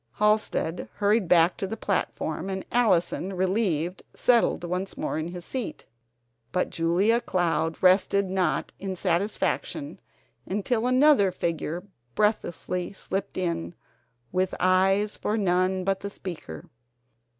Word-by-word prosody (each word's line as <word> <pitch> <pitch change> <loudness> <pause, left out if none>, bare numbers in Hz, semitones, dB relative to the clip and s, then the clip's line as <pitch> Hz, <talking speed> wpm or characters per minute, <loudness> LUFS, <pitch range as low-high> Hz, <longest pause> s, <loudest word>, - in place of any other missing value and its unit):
Halsted 210 -5 +1
hurried 205 -1 +2
back 170 0 +4
to 195 - -3
the 225 - -5
platform, 195 - -2
and 190 0 -4
Allison, 190 -5 +2
relieved, 185 -2 0
settled 235 -7 +3
once 180 +2 -3
more - - -2
in 160 - -3
his 175 0 -7
seat. 255 -4 -5 0.7
But 180 - 0
Julia 185 +8 +2
Cloud 165 -4 0
rested 190 +1 +4
not 185 -4 0
in 190 -1 -4
satisfaction 200 - -1 0.5
until 220 +4 0
another 255 -5 +5
figure 170 0 -3 0.3
breathlessly 180 -4 -1
slipped 195 0 -4
in 170 -2 -2 0.6
with 185 +1 0
eyes 195 +3 +3
for 215 - -1
none 185 -1 +1
but 195 0 0
the 200 - -5
speaker. 160 - -8
190 Hz, 120 wpm, -26 LUFS, 175-205 Hz, 0.7 s, another